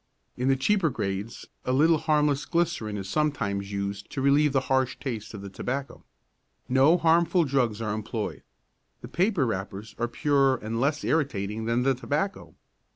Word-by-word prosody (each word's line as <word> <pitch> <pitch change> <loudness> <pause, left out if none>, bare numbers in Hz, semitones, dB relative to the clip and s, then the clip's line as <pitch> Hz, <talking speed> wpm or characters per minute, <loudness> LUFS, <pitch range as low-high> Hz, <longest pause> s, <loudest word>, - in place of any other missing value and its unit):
In 125 - -2
the 135 - +4
cheaper 170 +5 +2
grades 100 -2 -4 0.2
a 125 - -1
little 155 +4 +4
harmless 150 -2 +1
glycerine 165 -12 -1
is 95 -1 -5
sometimes 100 -8 -1
used 100 0 -4
to - - -5
relieve 140 +2 +4
the 135 -1 +2
harsh 130 -1 0
taste 115 -5 -5
of 100 - -8
the 100 - -6
tobacco. 135 +7 -4 0.6
No 135 +7 +5
harmful 170 +1 +3
drugs 125 -6 0
are 105 -2 -1
employed. 110 0 -4 0.6
The - - -8
paper 185 -5 +1
wrappers 105 0 -4
are 120 - +1
purer 135 +2 +2
and 115 0 -4
less 145 +3 0
irritating 110 -8 -1
than 115 +2 +1
the 135 +1 +3
tobacco. 145 +9 -3
130 Hz, 160 wpm, -27 LUFS, 110-150 Hz, 0.6 s, No